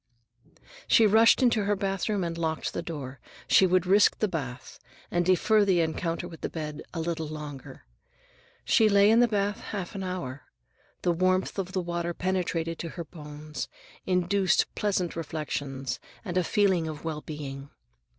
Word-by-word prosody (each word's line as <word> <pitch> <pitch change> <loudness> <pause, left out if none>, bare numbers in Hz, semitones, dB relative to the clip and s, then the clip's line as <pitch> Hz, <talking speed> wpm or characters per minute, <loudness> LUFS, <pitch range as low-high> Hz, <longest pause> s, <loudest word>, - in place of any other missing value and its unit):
She 225 - +6
rushed 225 +4 +6
into 230 -4 +3
her 205 +1 +2
bathroom 195 +1 -1
and 170 -1 -3
locked 160 -1 -2
the - - -2
door. 135 -5 -6 0.3
She 190 - +6
would 185 0 +2
risk 200 +3 +5
the 215 - +1
bath, 135 -8 -6 0.3
and 175 0 +2
defer 205 +4 +4
the 190 -3 +3
encounter 165 +1 -2
with 165 -2 -11
the - - -2
bed 150 -2 -5
a 170 - -5
little 160 -1 -2
longer. 150 -3 -8 0.8
She 215 - +4
lay 200 +1 +6
in 225 - +5
the 245 - +6
bath 205 -2 0
half 195 -4 -5
an 195 - -5
hour. 160 -8 -5 0.6
The 175 - +3
warmth 185 +3 +1
of 190 0 -4
the 185 - 0
water 170 0 -3
penetrated 170 -3 -1
to 170 - -4
her 170 - -3
bones, 150 -1 -7 0.4
induced 185 +1 +2
pleasant 190 -4 -1
reflections 145 -4 -4 0.3
and 180 -3 -4
a 185 - +3
feeling 185 -3 +2
of 155 -2 -6
well 155 -2 -3
being. 140 -3 -7
175 Hz, 165 wpm, -28 LUFS, 155-195 Hz, 0.8 s, She